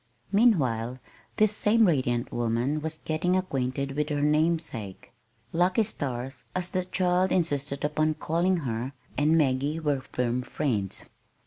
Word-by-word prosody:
Meanwhile 130 Hz, -, +3 dB, 0.4 s
this 215 Hz, -1 st, +3 dB
same 220 Hz, +2 st, +4 dB
radiant 130 Hz, -7 st, +1 dB
young -, -, -4 dB
woman 120 Hz, +6 st, 0 dB
was 160 Hz, 0 st, -3 dB
getting 170 Hz, +4 st, 0 dB
acquainted 140 Hz, -6 st, -2 dB
with 150 Hz, +2 st, -1 dB
her 145 Hz, -1 st, -1 dB
namesake. 150 Hz, -, 0 dB, 0.4 s
"Lucky 180 Hz, +6 st, +3 dB
Stars," 130 Hz, -, -4 dB
as 180 Hz, 0 st, -1 dB
the 185 Hz, -2 st, -1 dB
child 185 Hz, 0 st, +1 dB
insisted 145 Hz, -5 st, 0 dB
upon 155 Hz, +1 st, +1 dB
calling 175 Hz, +5 st, +1 dB
her, 120 Hz, +3 st, -3 dB, 0.2 s
and 155 Hz, +3 st, +3 dB
Maggie 145 Hz, +1 st, +1 dB
were 145 Hz, -4 st, 0 dB
firm 125 Hz, -1 st, -1 dB
friends. 120 Hz, -8 st, -2 dB
150 Hz, 135 wpm, -27 LUFS, 130-175 Hz, 0.4 s, same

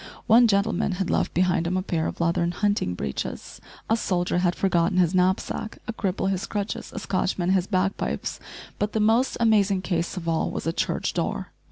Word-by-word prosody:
One 235 Hz, +1 st, +6 dB
gentleman 200 Hz, -1 st, +1 dB
had 180 Hz, 0 st, -2 dB
left -, -, +1 dB
behind 180 Hz, -1 st, +2 dB
him 185 Hz, +2 st, 0 dB
a 185 Hz, -, -1 dB
pair 165 Hz, -4 st, -1 dB
of -, -, -6 dB
leathern 170 Hz, +1 st, +1 dB
hunting 205 Hz, -, 0 dB
breeches, 70 Hz, -5 st, -5 dB, 0.3 s
a 225 Hz, -, +3 dB
soldier 180 Hz, -5 st, 0 dB
had 180 Hz, -1 st, +1 dB
forgotten 180 Hz, -1 st, +1 dB
his 180 Hz, -1 st, +3 dB
knapsack, 185 Hz, +4 st, 0 dB
a 230 Hz, -, -3 dB
cripple 195 Hz, -3 st, -1 dB
his 190 Hz, -1 st, -1 dB
crutches! 205 Hz, 0 st, -4 dB
a -, -, -9 dB
Scotchman 185 Hz, -1 st, -1 dB
his 190 Hz, -1 st, +2 dB
bagpipes; 190 Hz, 0 st, -1 dB, 0.4 s
but 210 Hz, +1 st, -1 dB
the 220 Hz, -, +1 dB
most 225 Hz, +5 st, +2 dB
amazing 205 Hz, -4 st, +3 dB
case 175 Hz, 0 st, -2 dB
of 170 Hz, -2 st, -5 dB
all 165 Hz, -1 st, +1 dB
was -, -, -5 dB
a 165 Hz, -, 0 dB
church -, -, -1 dB
door! -, -, -2 dB
185 Hz, 190 wpm, -25 LUFS, 175-205 Hz, 0.4 s, One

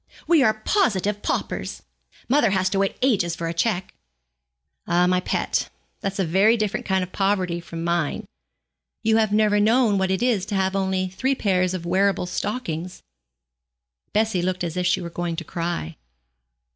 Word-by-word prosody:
We 335 Hz, -4 st, +4 dB
are 220 Hz, -4 st, +4 dB
positive 210 Hz, -, 0 dB
paupers. -, -, -3 dB, 0.4 s
Mother 255 Hz, -3 st, +3 dB
has 190 Hz, -1 st, +1 dB
to 195 Hz, -, +1 dB
wait 195 Hz, 0 st, 0 dB
ages 190 Hz, -10 st, +2 dB
for 170 Hz, -1 st, -4 dB
a 165 Hz, -, -2 dB
cheque.' 180 Hz, +1 st, -1 dB, 0.9 s
'Ah, 175 Hz, +1 st, +3 dB
my 180 Hz, 0 st, +2 dB
pet, -, -, -1 dB, 0.3 s
that's 195 Hz, 0 st, -3 dB
a 190 Hz, -, +1 dB
very 195 Hz, +8 st, +4 dB
different 215 Hz, -2 st, -2 dB
kind 190 Hz, -1 st, +1 dB
of 180 Hz, -, -7 dB
poverty 190 Hz, -3 st, 0 dB
from 165 Hz, -1 st, -7 dB
mine. 170 Hz, -3 st, -1 dB, 0.8 s
You 220 Hz, 0 st, +3 dB
have 220 Hz, -2 st, +2 dB
never 210 Hz, 0 st, +3 dB
known 220 Hz, -1 st, +3 dB
what 190 Hz, 0 st, +1 dB
it 190 Hz, +5 st, 0 dB
is 235 Hz, -7 st, +2 dB
to 205 Hz, -, -3 dB
have 190 Hz, 0 st, +1 dB
only 190 Hz, -1 st, 0 dB
three 260 Hz, +9 st, 0 dB
pairs 185 Hz, -5 st, +1 dB
of 170 Hz, -2 st, -6 dB
wearable 190 Hz, +2 st, +1 dB
stockings.' 180 Hz, -3 st, -4 dB, 1.1 s
Bessie 215 Hz, -3 st, +1 dB
looked 180 Hz, 0 st, -1 dB
as 170 Hz, -1 st, -3 dB
if 180 Hz, -1 st, 0 dB
she -, -, +2 dB
were 170 Hz, -1 st, -6 dB
going 175 Hz, 0 st, -3 dB
to 170 Hz, -, -5 dB
cry. 165 Hz, -, -4 dB
190 Hz, 170 wpm, -23 LUFS, 175-210 Hz, 1.1 s, We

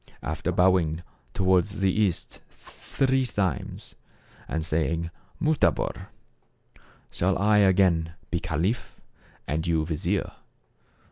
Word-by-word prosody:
After -, -, -2 dB
bowing 90 Hz, -3 st, +2 dB, 0.3 s
toward 95 Hz, -2 st, +3 dB
the 100 Hz, -2 st, 0 dB
east 100 Hz, -6 st, -1 dB
three 130 Hz, -1 st, -1 dB
times 95 Hz, -, -3 dB, 0.5 s
and 80 Hz, 0 st, -2 dB
saying 80 Hz, +1 st, -1 dB
' -, -, -32 dB
Mutabor/ 155 Hz, -2 st, +1 dB, 1.0 s
shall 95 Hz, +2 st, +1 dB
I 105 Hz, +2 st, +4 dB
again 90 Hz, -4 st, +3 dB, 0.2 s
be 85 Hz, -, 0 dB
caliph, 90 Hz, +6 st, -2 dB, 0.5 s
and 80 Hz, +3 st, -2 dB
you 80 Hz, -2 st, +1 dB
vizier 80 Hz, -2 st, -1 dB
90 Hz, 105 wpm, -26 LUFS, 80-100 Hz, 1.0 s, I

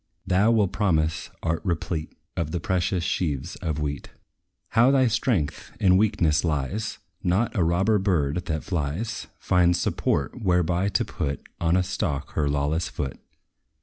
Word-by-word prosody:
Thou 95 Hz, +3 st, +3 dB
with 105 Hz, -5 st, +3 dB
promise 80 Hz, -7 st, 0 dB
art 80 Hz, -1 st, 0 dB
replete 85 Hz, -2 st, -3 dB, 0.2 s
Of 80 Hz, -2 st, -1 dB
the 85 Hz, -, -2 dB
precious 90 Hz, 0 st, 0 dB
sheaves 80 Hz, -2 st, -1 dB
of 80 Hz, -4 st, -3 dB
wheat. 70 Hz, -2 st, -3 dB, 0.6 s
How 120 Hz, +3 st, +5 dB
thy 135 Hz, -1 st, +4 dB
strength 110 Hz, -, 0 dB
in 95 Hz, -2 st, +5 dB
weakness 95 Hz, -6 st, +3 dB
lies! 80 Hz, +7 st, -1 dB, 0.2 s
Not 95 Hz, +7 st, +1 dB
a 95 Hz, -, +3 dB
robber 95 Hz, +6 st, +3 dB
bird, 90 Hz, -4 st, 0 dB
that 80 Hz, -2 st, -2 dB
flies, 90 Hz, +6 st, -3 dB
Finds 90 Hz, -1 st, +3 dB
support 70 Hz, -, -1 dB
whereby 90 Hz, 0 st, +2 dB
to -, -, +1 dB
put 70 Hz, 0 st, -4 dB
On 85 Hz, +1 st, +2 dB
a 95 Hz, -, +2 dB
stalk 80 Hz, -6 st, -2 dB
her 75 Hz, -2 st, 0 dB
lawless 75 Hz, +3 st, 0 dB
foot. 65 Hz, -3 st, -4 dB
85 Hz, 150 wpm, -25 LUFS, 75-95 Hz, 0.6 s, How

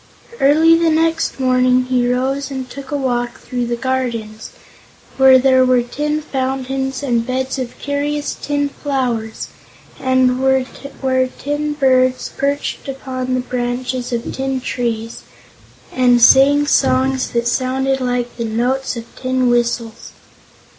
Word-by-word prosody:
Early 315 Hz, +4 st, +5 dB
the 330 Hz, 0 st, +2 dB
next 325 Hz, -1 st, 0 dB
morning 255 Hz, -1 st, +3 dB
he 250 Hz, -1 st, +1 dB
rose 265 Hz, +2 st, -1 dB
and 265 Hz, -2 st, -5 dB
took 270 Hz, +1 st, -10 dB
a 290 Hz, -, -1 dB
walk 245 Hz, -3 st, -2 dB
through 245 Hz, -1 st, -4 dB
the 240 Hz, -, -1 dB
gardens, 235 Hz, -4 st, -3 dB, 0.7 s
where 265 Hz, -1 st, +7 dB
there 260 Hz, 0 st, +4 dB
were 255 Hz, -1 st, +3 dB
tin 300 Hz, +5 st, -3 dB
fountains 265 Hz, 0 st, -3 dB
and 240 Hz, -4 st, +1 dB
beds 260 Hz, +1 st, -2 dB
of 250 Hz, -2 st, -5 dB
curious 290 Hz, +1 st, -2 dB
tin 285 Hz, -1 st, -2 dB
flowers, 250 Hz, -6 st, -3 dB, 0.5 s
and 260 Hz, -1 st, +2 dB
where 265 Hz, 0 st, 0 dB
tin 290 Hz, +3 st, -3 dB
birds 255 Hz, -3 st, +2 dB
perched 280 Hz, +1 st, -2 dB
upon 255 Hz, -1 st, -4 dB
the 255 Hz, -, 0 dB
branches 250 Hz, 0 st, -3 dB
of 235 Hz, 0 st, -3 dB
tin 265 Hz, 0 st, -2 dB
trees 230 Hz, -3 st, -3 dB, 0.7 s
and 245 Hz, -1 st, +3 dB
sang 280 Hz, +4 st, +6 dB
songs 265 Hz, -2 st, +2 dB
that 235 Hz, 0 st, 0 dB
sounded 265 Hz, +2 st, 0 dB
like 245 Hz, -1 st, -2 dB
the 235 Hz, -, -2 dB
notes 245 Hz, +4 st, -1 dB
of 230 Hz, -, -6 dB
tin 255 Hz, -1 st, 0 dB
whistles. 235 Hz, -1 st, -2 dB
260 Hz, 135 wpm, -18 LUFS, 245-270 Hz, 0.7 s, where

